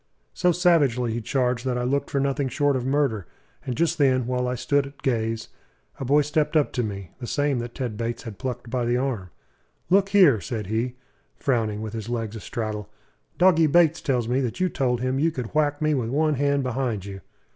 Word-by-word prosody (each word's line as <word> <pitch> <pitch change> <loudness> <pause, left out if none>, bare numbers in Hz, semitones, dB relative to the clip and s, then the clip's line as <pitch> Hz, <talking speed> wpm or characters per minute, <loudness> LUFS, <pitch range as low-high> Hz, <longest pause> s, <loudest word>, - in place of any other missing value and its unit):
So 180 - +2
savagely 145 -10 +2
he 120 - -2
charged 125 0 0
that 125 -1 0
I 125 - -1
looked 140 +3 0
for 140 - 0
nothing 140 0 0
short 145 0 +1
of 130 0 -2
murder; 135 - 0 0.4
and 125 - -4
just 165 0 +1
then, 130 -3 +3
while 125 0 -1
I 125 - -1
stood 140 +3 +1
at 140 0 -16
gaze, 115 -3 -1 0.5
a 135 - -3
boy 145 +3 +4
stepped 150 +1 +1
up 150 - +2
to 125 - 0
me 100 -5 -5
the 120 - -6
same 145 -2 0
that 120 0 -6
Ted 120 -5 -4
Bates 115 +1 -3
had 110 -5 -8
plucked 125 -2 -5
by 125 -1 0
the 120 +1 +1
arm. 125 -9 -2 0.6
"Look 195 +1 +4
here!" 180 - +5
said 110 -1 -4
he, 115 +5 -2 0.4
frowning, 110 -5 0
with 110 0 -6
his 110 0 -5
legs 115 -2 -3
a - - -5
straddle. 105 -2 -4 0.5
"Doggy 170 -3 +5
Bates 165 +1 +4
tells 125 -5 0
me 125 +3 +1
that 125 +5 -3
you 185 0 +2
told 125 -6 0
him 130 +1 0
you 160 +3 +3
could 125 -8 -6
whack 150 -1 +1
me 155 0 +3
with 125 -5 -1
one 155 +4 +2
hand 140 0 +1
behind 125 -6 -2
you." 95 -1 -8
130 Hz, 215 wpm, -24 LUFS, 115-145 Hz, 0.6 s, here